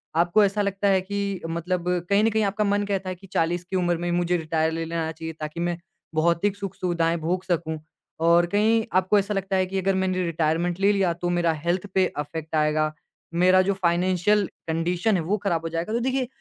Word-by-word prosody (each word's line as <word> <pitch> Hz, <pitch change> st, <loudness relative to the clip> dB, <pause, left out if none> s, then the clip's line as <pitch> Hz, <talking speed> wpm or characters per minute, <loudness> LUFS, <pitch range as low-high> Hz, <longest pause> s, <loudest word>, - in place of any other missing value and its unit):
आपको 175 Hz, +5 st, +4 dB
ऐसा 200 Hz, +1 st, +1 dB
लगता 200 Hz, 0 st, 0 dB
है 190 Hz, -1 st, +4 dB
कि 200 Hz, 0 st, -3 dB
मतलब 170 Hz, +2 st, -2 dB, 0.2 s
कहीं 200 Hz, +1 st, +4 dB
न 225 Hz, -, +4 dB
कहीं 220 Hz, 0 st, +1 dB
आपका 205 Hz, +1 st, 0 dB
मन 205 Hz, 0 st, +1 dB
कहता 195 Hz, -2 st, -2 dB
है 185 Hz, -, -4 dB
कि 195 Hz, +2 st, -16 dB
40 170 Hz, +2 st, 0 dB
की 185 Hz, +2 st, -6 dB
उम्र 175 Hz, -2 st, +1 dB
में 175 Hz, +1 st, -2 dB
मुझे 175 Hz, 0 st, +1 dB
रिटायर 160 Hz, 0 st, 0 dB
ले 165 Hz, 0 st, -3 dB
लेना 165 Hz, -1 st, -2 dB
चाहिए 160 Hz, 0 st, -7 dB
ताकि 155 Hz, +2 st, -5 dB
मैं 175 Hz, 0 st, -1 dB, 0.4 s
भौतिक 170 Hz, +5 st, +2 dB
सुख-सुविधाएँ 180 Hz, -4 st, -1 dB
भोग 180 Hz, +4 st, -1 dB
सकूँ। 170 Hz, -3 st, -2 dB, 0.5 s
और 170 Hz, +1 st, +5 dB
कहीं 220 Hz, +2 st, +3 dB
आपको 185 Hz, +3 st, +3 dB
ऐसा 200 Hz, +1 st, -2 dB
लगता 195 Hz, -1 st, -1 dB
है 185 Hz, 0 st, +2 dB
कि 190 Hz, +1 st, -4 dB
अगर 195 Hz, +1 st, +1 dB
मैंने 185 Hz, -1 st, 0 dB
रिटायरमेंट 170 Hz, +2 st, 0 dB
ले 200 Hz, +1 st, +4 dB
लिया, 195 Hz, -3 st, +2 dB
तो 175 Hz, +1 st, -3 dB
मेरा 175 Hz, -1 st, +2 dB
हेल्थ 170 Hz, +5 st, -2 dB
पे 190 Hz, -1 st, +4 dB
अफेक्ट 155 Hz, +2 st, -4 dB
आएगा, 155 Hz, 0 st, +1 dB, 0.4 s
मेरा 185 Hz, +2 st, +5 dB
जो 195 Hz, +1 st, +1 dB
फाइनेंशियल 185 Hz, +3 st, +2 dB, 0.2 s
कंडीशन 175 Hz, +6 st, 0 dB
है 180 Hz, -, +1 dB
वो 200 Hz, +6 st, 0 dB
खराब 170 Hz, -5 st, 0 dB
हो -, -, -2 dB
जाएगा। 170 Hz, +6 st, -3 dB
तो 235 Hz, -, +1 dB
देखिए 260 Hz, +1 st, 0 dB
180 Hz, 210 wpm, -24 LUFS, 165-195 Hz, 0.5 s, और